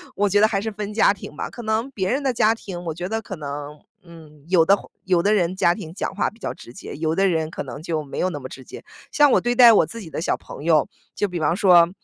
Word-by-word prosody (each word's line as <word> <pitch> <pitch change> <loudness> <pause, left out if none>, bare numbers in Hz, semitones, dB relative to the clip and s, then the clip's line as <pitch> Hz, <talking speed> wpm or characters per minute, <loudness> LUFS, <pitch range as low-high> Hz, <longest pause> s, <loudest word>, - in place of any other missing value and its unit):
我 205 0 +1
觉 205 +2 +3
得 215 - +6
还 200 -3 -1
是 220 0 -3
分 210 0 -6
家 215 - +4
庭 190 -6 -8
吧。 - - -4
可 240 - -9
能 220 +4 -1
别 195 -7 -2
人 275 +3 0
的 270 -2 +1
家 220 -1 +3
庭， 185 -6 -8
我 160 - -3
觉 175 +3 -5
得 225 0 -2
可 195 -4 -7
能， 145 0 -7 0.2
嗯， 155 -4 -15
有 180 -2 +4
的 195 - +6
话 - - -13 0.2
有 180 -3 +3
的 210 +1 +3
人 185 -2 +1
家 175 -2 +3
庭 160 -1 -8
讲 195 - -4
话 205 - 0
比 220 - -22
较 - - -4
直 120 - -13
接， - - -9
有 160 +1 -1
的 195 +2 +3
人 160 -3 0
可 - - -5
能 140 +2 -8
就 160 -2 -3
没 140 - -9
有 185 - +1
那 150 - -5
么 130 - -7
直 130 - -11
接。 - - -11 0.3
像 290 -2 +5
我 - - +4
对 240 0 0
待 240 -2 +9
我 - - +5
自 230 - -9
己 170 - -9
的 155 - -5
小 - - 0
朋 - - -11
友， 155 -3 +3 0.3
就 205 - 0
比 180 -2 -5
方 160 +2 +1
说， 175 -4 +6
180 Hz, 315 characters per minute, -22 LUFS, 160-215 Hz, 0.3 s, 待